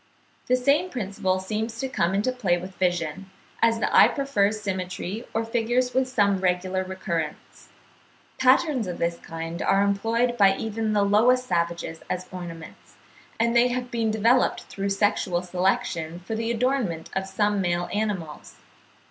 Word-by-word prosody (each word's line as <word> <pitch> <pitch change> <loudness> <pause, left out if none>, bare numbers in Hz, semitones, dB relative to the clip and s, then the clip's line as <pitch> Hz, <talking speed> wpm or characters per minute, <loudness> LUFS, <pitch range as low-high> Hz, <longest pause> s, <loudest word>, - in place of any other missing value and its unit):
The 255 - +4
same 280 +8 +2
principle 195 - -1
seems 220 +4 -3
to 265 - -1
come 190 -8 0
into 210 +6 +1
play 200 -9 +1
with 185 +2 -8
vision, 175 -1 -2 0.3
as 230 0 +4
the - - 0
eye - - +9
prefers 215 -7 0
symmetry 190 +2 -4
or 225 +1 -1
figures 240 +2 0
with 260 0 +2
some 200 -6 +2
regular 185 0 0
recurrence. 180 -4 -5 0.7
Patterns 260 - +3
of 180 - -4
this 170 0 -1
kind 165 +1 -6
are 195 +1 +3
employed 225 +4 0
by 195 -1 +6
even 220 0 -2
the 205 -1 +3
lowest 245 +5 +4
savages 170 -3 -2
as 185 0 -2
ornaments; 170 -3 -9 0.4
and 235 +1 +2
they 240 +1 +6
have 250 0 -3
been 230 -2 0
developed 230 +4 +2
through 200 0 -4
sexual 195 -3 +1
selection 175 -2 -1
for 205 +5 -6
the 225 +1 -2
adornment 235 -9 -1
of 190 0 -1
some 205 +1 0
male 175 -1 0
animals. 200 -8 -3
200 Hz, 155 wpm, -25 LUFS, 180-235 Hz, 0.7 s, eye